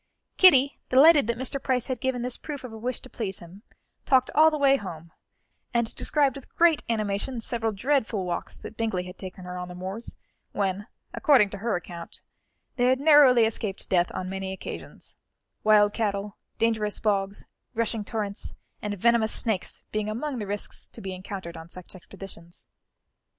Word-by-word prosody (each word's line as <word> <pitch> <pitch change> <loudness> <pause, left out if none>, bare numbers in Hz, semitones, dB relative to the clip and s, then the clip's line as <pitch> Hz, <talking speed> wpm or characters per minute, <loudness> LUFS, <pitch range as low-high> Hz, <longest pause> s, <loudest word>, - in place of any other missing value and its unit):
Kitty, 280 -7 +6
delighted 285 0 +7
that 235 0 -1
Mr. 260 +2 -3
Price 250 -2 0
had 255 -3 -4
given 260 -2 -1
this 250 0 -2
proof 290 -3 -7
of 245 -3 -8
a - - -7
wish 250 +2 -3
to - - -11
please 205 -7 -4
him, 175 +4 -13 0.4
talked 260 -1 +3
all 315 +1 +7
the 310 - -2
way 275 -1 +4
home, 170 - -8 0.6
and 235 -1 +1
described 285 -3 +1
with 275 - -12
great 335 -3 +4
animation 215 +3 -1
several 225 0 -1
dreadful 220 -3 0
walks 175 - -4
that 220 - -10
Bingley 220 -5 -1
had 180 0 -10
taken 185 -1 -8
her 180 0 -6
on 180 - -5
the 180 - -9
moors, 190 +5 -6 0.4
when, 200 0 -1 0.3
according 250 -10 +4
to 200 - -6
her 225 +1 0
account, 170 -1 -8 0.6
they 245 - +3
had 260 +1 +3
narrowly 280 -6 +7
escaped 215 -3 -3
death 175 -1 +3
on 185 - -3
many 190 0 -4
occasions 190 - -8 0.5
wild 210 -1 +5
cattle, 205 -2 -2 0.2
dangerous 220 -2 0
bogs, 200 -2 -1 0.3
rushing 225 -1 -1
torrents 205 -2 -4 0.3
and 205 -1 -3
venomous 230 +2 +3
snakes 220 -6 -1
being 215 0 -1
among 255 +4 -3
the 205 - -4
risks 205 +1 -4
to - - -12
be 190 -1 -5
encountered 185 -2 -7
on 165 0 -10
such 180 0 -11
expeditions. 185 -2 -12
215 Hz, 175 wpm, -26 LUFS, 195-255 Hz, 0.6 s, delighted